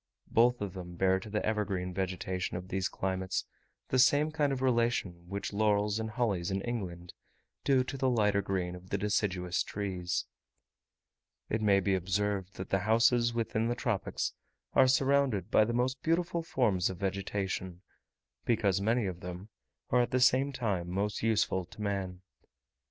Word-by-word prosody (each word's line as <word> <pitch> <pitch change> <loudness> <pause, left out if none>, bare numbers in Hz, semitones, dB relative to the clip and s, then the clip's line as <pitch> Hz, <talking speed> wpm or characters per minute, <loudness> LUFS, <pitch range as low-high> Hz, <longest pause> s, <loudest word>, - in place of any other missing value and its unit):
Both 120 +1 +4
of 100 -3 -3
them 90 -2 -8
bear 95 +1 +2
to 105 - -10
the 105 0 -1
evergreen 100 -4 -1
vegetation 95 -1 -2
of 90 +1 -8
these 95 -1 -1
climates 95 0 -2 0.4
the 130 - +2
same 145 +4 +4
kind 150 -3 +1
of 135 - -1
relation 115 -8 0
which 100 +2 -4
laurels 105 0 +2
and 110 0 -3
hollies 105 -7 -1
in 95 0 -1
England 90 -7 -5 0.5
do 135 -2 +3
to 135 +2 -6
the 130 -1 +2
lighter 105 -4 +2
green 95 -2 -2
of 90 +1 -11
the 100 - 0
deciduous 95 -3 0
trees. 95 -3 -2 1.2
It 110 - 0
may 100 -2 +4
be 100 0 +1
observed, 95 +1 -1
that 95 - -7
the 95 - +3
houses 115 +3 +3
within 115 -1 0
the 120 - 0
tropics 115 -5 -2 0.4
are 130 - +6
surrounded 135 -4 +2
by 110 - +5
the 115 - -2
most 125 +2 0
beautiful 170 +1 0
forms 115 - +1
of 95 - -6
vegetation, 95 -1 -3 0.6
because 100 -5 +1
many 115 +2 +2
of 90 -2 -4
them 90 +3 -7 0.4
are 125 - +5
at 120 - 0
the 130 - +1
same 130 +2 +4
time 105 -10 -2
most 100 +3 -1
useful 110 -4 +1
to 100 - -16
man. 95 -3 -3
100 Hz, 165 wpm, -31 LUFS, 95-120 Hz, 1.2 s, are